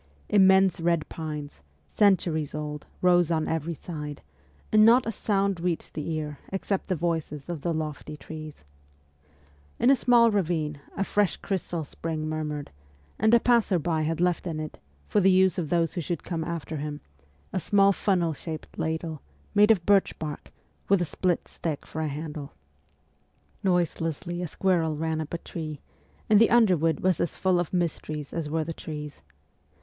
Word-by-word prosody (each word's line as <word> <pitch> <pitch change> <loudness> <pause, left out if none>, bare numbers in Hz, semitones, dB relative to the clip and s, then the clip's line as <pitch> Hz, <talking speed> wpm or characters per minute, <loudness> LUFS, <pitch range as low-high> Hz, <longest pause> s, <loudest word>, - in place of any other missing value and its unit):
Immense 190 -2 +5
red 170 -2 +1
pines, 150 - -6 0.3
centuries 170 - +2
old, 150 -1 -5 0.2
rose 175 -2 +5
on 160 -2 0
every 160 +1 -2
side, 150 -3 -7 0.5
and 215 0 +6
not 235 +3 +6
a 225 - -1
sound 200 -4 0
reached 175 -1 -2
the 150 +1 -4
ear 150 -2 -4
except 195 0 -2
the 185 - 0
voices 160 -3 -2
of 170 -4 -4
the 170 - -1
lofty 155 -1 -4
trees. 155 - -9 1.1
In 255 - +4
a - - +7
small 240 -2 +5
ravine 160 -7 -1 0.2
a 195 - +1
fresh 205 -2 +1
crystal 175 -4 -3
spring 155 +1 -4
murmured, 150 -2 -4 0.5
and 220 +2 +4
a - - +6
passer 230 -6 +3
by 160 -1 0
had 160 +1 -1
left 180 0 +1
in 160 -2 -3
it, 155 -1 -6 0.3
for - - +2
the 195 - +5
use 190 0 +4
of 160 -4 -3
those 170 -1 +1
who 175 - -2
should 170 +2 -3
come 165 -2 -3
after 165 -1 -4
him, 150 0 -5 0.5
a - - +1
small 200 +2 +4
funnel 180 -5 +1
shaped 160 +1 -8
ladle, 160 -1 -2 0.3
made 210 +1 +5
of 195 -7 +4
birch 200 -1 +3
bark, 150 -2 -6 0.4
with 200 -1 +5
a 175 - +1
split 175 +3 -1
stick 155 -4 -4
for 160 - -5
a 155 - 0
handle. 150 0 -6 1.1
Noiselessly 175 -1 0
a 175 - -2
squirrel 165 -3 +1
ran 160 0 -1
up 155 - -7
a 170 - -2
tree, 155 -3 -6 0.5
and 215 0 +6
the 230 - +6
underwood 180 -9 +3
was 185 -3 +2
as 170 - -1
full 185 -2 +2
of 175 - -2
mysteries 155 -4 -2
as 160 -3 -3
were 160 +1 0
the 165 +1 -5
trees. 150 -2 -7
165 Hz, 170 wpm, -27 LUFS, 155-185 Hz, 1.1 s, a